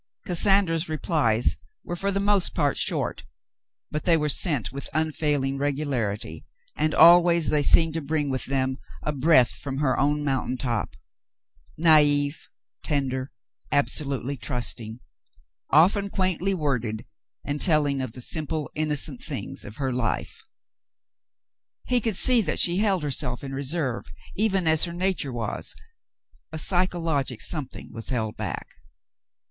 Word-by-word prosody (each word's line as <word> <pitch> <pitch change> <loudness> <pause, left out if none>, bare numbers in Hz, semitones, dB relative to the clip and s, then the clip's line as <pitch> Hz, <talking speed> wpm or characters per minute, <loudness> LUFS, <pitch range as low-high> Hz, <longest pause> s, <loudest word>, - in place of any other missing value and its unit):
Cassandra's 175 -2 +2
replies 145 -7 +1 0.3
were 175 - -5
for 195 +3 -1
the 195 - -1
most 200 -2 +1
part 145 -1 +1
short, - - -2 0.7
but 150 - -3
they 170 -2 +3
were 150 -1 -1
sent 145 - +3
with 140 - -7
unfailing 150 -3 0
regularity, 125 - -2 0.3
and 155 +1 0
always 170 -1 +6
they 150 - +3
seemed 160 +2 +5
to 165 - -3
bring 145 -1 -1
with 130 - -3
them 130 0 -1 0.2
a 150 - -1
breath 140 -3 +4
from 135 -2 -6
her 140 -2 0
own 145 +2 +1
moun 135 -2 -1
tain 130 - -3
top 120 -4 -3 0.4
— - - -35
naive 145 -1 +3 0.2
— - - -47
tender 130 -2 -1 0.2
— - - -37
absolutely 140 -2 -2
trusting 115 0 -3 0.4
— - - -32 0.3
often 195 +6 +4
quaintly 185 0 0
worded, 120 -8 -2 0.4
and 145 0 -3
telling 145 -5 +2
of 130 -4 -5
the 125 - -7
simple, 155 +3 -2
innocent 150 -3 -2
things - - -6
of 105 - -10
her 135 -1 -2
life. 115 -8 -2 1.4
He 250 -1 +1
could 220 -2 0
see 245 +4 +6
that 165 -7 -2
she 175 +1 +4
held 195 -5 +1
herself 125 -3 0
in 135 -1 -6
reserve, 135 -2 -2 0.3
even 195 -4 +1
as 160 +1 +4
her 170 - -6
nature 180 -6 -1
was; 120 -2 -4 0.8
a 160 - -5
psychologic 165 - -1
something 150 -6 -4
was 115 0 -4
held 110 -4 -2
back. - - -5
145 Hz, 145 wpm, -25 LUFS, 130-170 Hz, 1.4 s, always